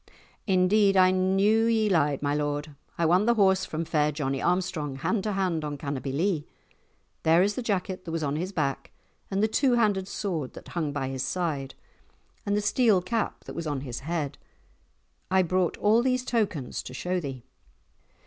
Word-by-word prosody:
"Indeed, 195 +1 +4
I 185 0 +6
knew 195 +4 +3
ye 220 -2 +2
lied, 150 -7 +1
my 145 0 +1
lord. 145 0 -2 0.2
I 170 - +1
won 180 +6 +3
the 235 - +4
horse 190 -3 +3
from 160 +1 -4
fair 150 -1 +1
Johnie 135 -2 -2
Armstrong 175 -6 -1
hand 195 +10 -1
to 210 - 0
hand 185 -5 0
on 145 -1 -4
Cannobie 140 -1 -4
Lee. 160 +2 0 0.7
There 165 +3 +4
is 205 +1 +1
the 255 - -4
jacket 190 -4 -2
that 165 - -5
was 165 -1 -2
on 140 0 -1
his 180 +5 -3
back, 140 -7 -2 0.4
and 195 +1 0
the - - +4
two 255 +3 +2
handed 205 -5 +2
sword 170 -11 -3
that - - -11
hung 160 -4 -2
by 135 -2 -3
his 135 -1 -4
side, 140 -2 -2 0.7
and 205 0 +2
the - - +1
steel 210 -1 +3
cap 225 +3 -2
that - - -8
was 165 -1 -4
on 145 -3 -2
his 125 -3 -5
head. 150 -1 -3 0.9
I 190 0 +4
brought 185 0 0
all 220 +3 +4
these 255 0 0
tokens 195 - -1
to 125 - -9
show 180 +5 -1
thee." 135 -6 -6
180 Hz, 185 wpm, -27 LUFS, 145-200 Hz, 0.9 s, I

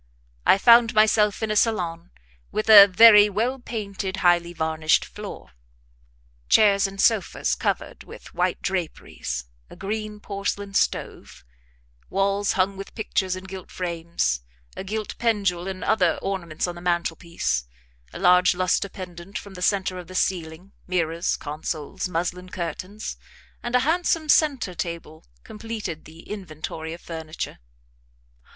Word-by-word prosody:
I - - +7
found 235 +2 +6
myself 215 -1 +3
in 220 - -1
a - - 0
salon 175 -7 0 0.4
with 215 +1 +1
a 200 -2 +11
very 210 +1 +8
well 235 +7 -1
painted, 200 -5 -5
highly 175 -1 +4
varnished 160 -1 +1
floor; - - -9 1.0
chairs 200 -2 +5
and 195 0 -10
sofas 220 -2 +2
covered - - -3
with - - -13
white - - -1
draperies, 165 - -4 0.2
a - - -12
green 210 +1 -4
porcelain 200 0 -4
stove, 65 - -2 0.7
walls 195 +1 +1
hung 195 +1 0
with 195 - -9
pictures 190 -4 -1
in 185 - -8
gilt 190 -1 -9
frames, 170 - -2 0.3
a - - -5
gilt 215 +2 -5
pendule 200 -6 0
and 190 -1 -5
other 185 -6 +2
ornaments 175 -5 -2
on 175 - -4
the 175 - -11
mantelpiece, 170 - -1 0.5
a - - -8
large 180 0 +5
lustre 185 +2 +1
pendent 180 +1 -8
from 200 - -9
the 180 - -10
centre 190 -1 0
of 175 - -10
the 185 - -10
ceiling, 175 0 -2 0.2
mirrors, 170 -2 0
consoles, 150 +2 -5
muslin 180 +2 -3
curtains, 185 +5 -5 0.4
and 240 +1 -2
a 250 - +5
handsome 330 -1 +1
centre 285 - +3
table 170 -2 -6 0.2
completed 210 -7 -6
the 160 +1 -13
inventory 160 -5 -7
of 170 - -8
furniture. 160 -1 -6
185 Hz, 135 wpm, -24 LUFS, 170-210 Hz, 1.0 s, a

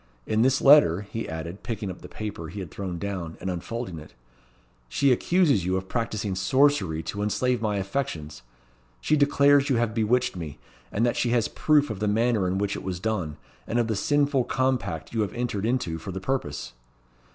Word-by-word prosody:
In 110 0 +1
this 130 +2 +3
letter," 135 - +7
he 115 +2 -5
added, 80 +4 -6
picking 110 -5 -4
up 90 - -11
the - - -9
paper 105 -6 -6
he 100 - -7
had 90 -5 -7
thrown 95 -3 -5
down, 90 -4 -4
and 95 - -3
unfolding 90 0 -5
it, 75 -4 -14 0.7
"she 140 - +3
accuses 145 - +3
you 95 +1 0
of 95 0 -5
practising 110 -4 -2
sorcery 95 - +2
to 100 - -4
enslave 125 +3 0
my 105 -2 0
affections. 95 - -3 0.6
She 155 - +2
declares 140 -1 +4
you 135 - +3
have 115 -2 +1
bewitched 120 +2 +1
me; 80 -4 -6 0.3
and 110 +3 +1
that 120 - 0
she 120 - +1
has 115 -2 +2
proof 145 -4 +2
of 105 - -5
the 105 - 0
manner 110 -2 +2
in 95 +1 0
which 100 0 -1
it - - -5
was 90 -2 -4
done, 90 -7 -2 0.3
and 120 - -1
of 120 - +3
the 110 -1 -1
sinful 140 +2 +2
compact 130 - -1
you 115 - +1
have 105 - -2
entered 115 -4 -2
into 100 -10 -1
for 90 +5 -6
the 95 - -4
purpose." 95 - -3
105 Hz, 195 wpm, -26 LUFS, 95-125 Hz, 0.7 s, letter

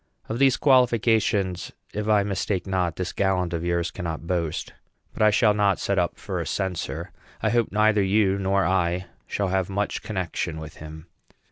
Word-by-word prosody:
Of 115 - -3
these 135 -2 +4
qualifications, 115 - +2 0.2
if 105 0 -3
I 105 -2 +4
mistake 100 -1 -2
not, 90 -3 -1
this 90 -1 -4
gallant 95 -3 0
of 85 0 -2
yours 85 -1 0
cannot 85 -3 -5
boast. 85 -3 -2 0.4
But - - -6
I 110 - +7
shall 105 0 +4
not 100 -2 +2
set 100 -1 0
up 85 - -1
for - - -4
a - - -3
censor. 95 -3 -3 0.3
I - - +2
hope 120 -2 +1
neither 105 0 +3
you 100 0 +2
nor 100 0 +1
I 90 -1 +1 0.2
shall 100 -2 -1
have 95 0 0
much 100 +2 -2
connection 90 -4 -3
with 80 0 -9
him. 80 +1 -10
95 Hz, 175 wpm, -25 LUFS, 90-105 Hz, 0.4 s, I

